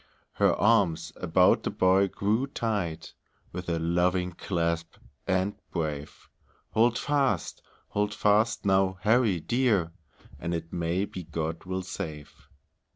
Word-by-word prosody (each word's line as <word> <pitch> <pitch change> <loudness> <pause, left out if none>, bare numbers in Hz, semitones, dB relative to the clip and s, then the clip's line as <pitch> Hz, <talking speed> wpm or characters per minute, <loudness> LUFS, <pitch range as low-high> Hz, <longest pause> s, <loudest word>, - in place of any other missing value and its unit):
Her - - +3
arms 85 -7 +2
about 90 +1 +3
the - - -2
boy 95 +1 +3
grew 105 +7 0
tight, 105 - -3 0.4
With 90 0 -6
a 85 - 0
loving 90 +2 +1
clasp, 85 -2 -2 0.3
and 95 +2 +1 0.2
brave; 75 -3 -4 0.4
"Hold 120 +2 +3
fast! 135 - 0 0.3
Hold 105 0 0
fast, 105 +2 +2
now, 95 -1 +3
Harry 110 -3 +3
dear, 105 -4 +1 0.5
And 85 +1 -2
it 85 0 -6
may 85 +3 0
be 95 -4 -8
God 80 +1 -4
will 95 0 -3
save." 80 -5 -7
95 Hz, 125 wpm, -28 LUFS, 85-105 Hz, 0.5 s, Her